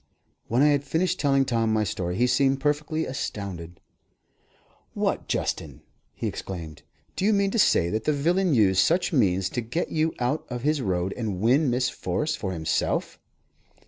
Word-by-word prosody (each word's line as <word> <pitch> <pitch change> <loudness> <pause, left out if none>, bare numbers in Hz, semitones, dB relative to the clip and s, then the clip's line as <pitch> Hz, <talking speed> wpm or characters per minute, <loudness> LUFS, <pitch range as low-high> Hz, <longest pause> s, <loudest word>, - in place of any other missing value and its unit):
When 120 +5 +2
I 150 - +6
had 145 -1 +2
finished 180 +6 0
telling 135 -2 +3
Tom 115 -3 0
my 110 -1 +2
story, 90 -2 -3
he 120 - +2
seemed 135 +2 +2
perfectly 150 +2 -1
astounded. 95 -9 -5 1.2
"What, - - -1
Justin!" - - -3 0.3
he - - -5
exclaimed, 80 -5 -6 0.3
"do - - -3
you 210 - +4
mean 200 -1 +2
to 230 - 0
say 85 - +3
that 110 0 -2
the - - +3
villain 170 +3 +1
used 95 -5 +4
such 175 - +1
means 95 - +2
to 120 - -3
get 120 +10 -3
you 160 0 0
out 125 +5 0
of 125 -1 -5
his 150 0 +1
road 90 -3 -1
and 105 -6 -3
win 130 +7 +3
Miss 125 +1 +1
Forrest 150 0 -2
for 95 - -3
himself?" 80 -3 -1
125 Hz, 175 wpm, -25 LUFS, 100-150 Hz, 1.2 s, I